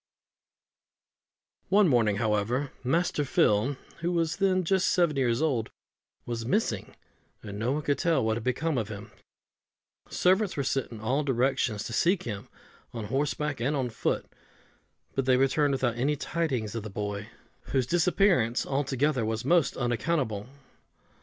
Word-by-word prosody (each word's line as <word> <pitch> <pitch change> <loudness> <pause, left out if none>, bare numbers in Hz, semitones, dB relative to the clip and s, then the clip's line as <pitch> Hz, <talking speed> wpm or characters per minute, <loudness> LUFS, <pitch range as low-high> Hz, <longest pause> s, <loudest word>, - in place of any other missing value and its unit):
One 200 0 +5
morning, 115 -7 +3
however, 110 +5 0
Master 160 +3 +1
Phil, 130 0 +2 0.2
who 170 +1 -1
was 165 -2 0
then 190 -2 +2
just 190 +2 +2
seven 170 -4 +2
years 125 0 +1
old, 125 -8 0 0.6
was 115 -1 -3
missing, 115 - -1 0.5
and 100 -1 -7
no 120 +4 0
one 150 +1 -2
could 145 0 0
tell 165 -9 +2
what 110 0 +1
had 115 - -4
become 130 +3 0
of 110 - -3
him: 105 0 -8 1.0
servants 190 +1 +2
were 140 - 0
sent 135 -1 -1
in 110 -2 -8
all 130 +7 0
directions 125 -4 0
to 115 - -6
seek 175 - +2
him, 105 -4 -6 0.5
on 115 -2 -4
horseback 145 0 -1
and 135 +6 0
on 130 -3 -1
foot, 110 - -1 0.9
but 135 - -1
they 130 -1 +4
returned 140 +2 +2
without 120 -3 0
any 140 +5 +1
tidings 140 -8 -2
of 115 - -3
the 110 - -7
boy, 105 +2 -4 0.4
whose 130 -2 0
disappearance 170 - +2
altogether 135 -1 0
was 110 0 -2
most 170 -2 +3
unaccountable. 120 -3 -1
130 Hz, 150 wpm, -28 LUFS, 115-155 Hz, 1.0 s, One